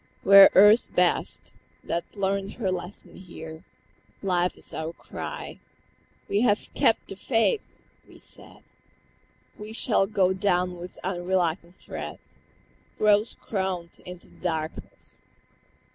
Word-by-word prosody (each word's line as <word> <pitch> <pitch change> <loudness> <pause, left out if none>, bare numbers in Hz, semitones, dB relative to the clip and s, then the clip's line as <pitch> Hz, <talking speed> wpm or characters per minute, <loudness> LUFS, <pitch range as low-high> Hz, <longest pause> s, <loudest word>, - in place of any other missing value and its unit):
"We 195 - +5
are 195 - +11
Earth's 210 +4 +7
best, 180 -1 0 0.3
that 170 0 -2
learnt 195 0 -1
her 200 -6 -2
lesson 180 +2 -7
here. 160 -3 -10 0.6
Life 180 -2 0
is - - -7
our 160 +1 -4
cry. - - -7 0.7
We 200 +2 +1
have 210 -4 +1
kept 225 - +2
the 195 - -6
faith!" 230 - +1 0.4
we - - -15
said; - - -11 1.0
"We 210 +1 -8
shall 215 -4 +2
go 190 -3 +2
down 180 -2 0
with 175 +1 -10
unreluctant 175 -1 -1
tread - - -7 0.8
Rose 210 +1 +3
crowned 190 -4 -4
into 180 -1 -11
the - - -21
darkness!" 160 -3 -5
190 Hz, 120 wpm, -26 LUFS, 175-205 Hz, 1.0 s, are